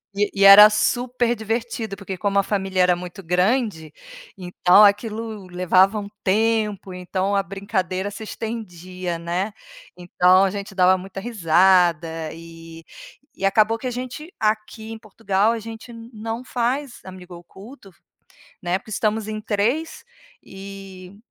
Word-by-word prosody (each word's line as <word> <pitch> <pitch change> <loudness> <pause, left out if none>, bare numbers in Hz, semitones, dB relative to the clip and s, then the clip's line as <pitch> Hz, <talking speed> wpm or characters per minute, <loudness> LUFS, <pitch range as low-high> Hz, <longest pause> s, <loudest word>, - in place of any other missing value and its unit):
E 205 +1 0
e 200 - 0
era 200 +2 +11
super 240 +3 0
divertido 225 -1 -4
porque 195 -1 -7
como 200 +1 0
a - - +2
família 195 -2 -1
era 180 -1 +4
muito 180 +2 -9
grande, 180 - 0 0.4
então 180 +2 +4
aquilo 215 0 0
levava 185 +3 +2
um 200 - -7
tempo, 210 -1 0
então 185 +2 -2
a 200 - +1
brincadeira 190 0 -3
se 205 +2 -9
estendia, 185 -6 -6
né. 180 +5 -3 0.4
Então 180 +1 +3
a 195 - +1
gente 200 0 -7
dava 185 0 +4
muita 190 +1 -8
risada 170 -5 +2
e 165 0 -12 0.6
e 195 - -1
acabou 215 +3 +3
que 245 - -11
a 250 - -1
gente 255 +7 -7
aqui 220 +1 -2
em 225 - -7
Portugal, 210 -1 -1
a 230 - -3
gente 225 +2 -10
não 230 0 -7
faz 255 +2 -2
amigo 185 -1 -11
oculto, 195 +6 -14 0.7
né, 175 +1 -1
porque 215 - -15
estamos 215 0 -1
em 215 0 -5
3, 235 +11 -2 0.4
e 195 -1 -11
200 Hz, 140 wpm, -22 LUFS, 185-220 Hz, 0.7 s, era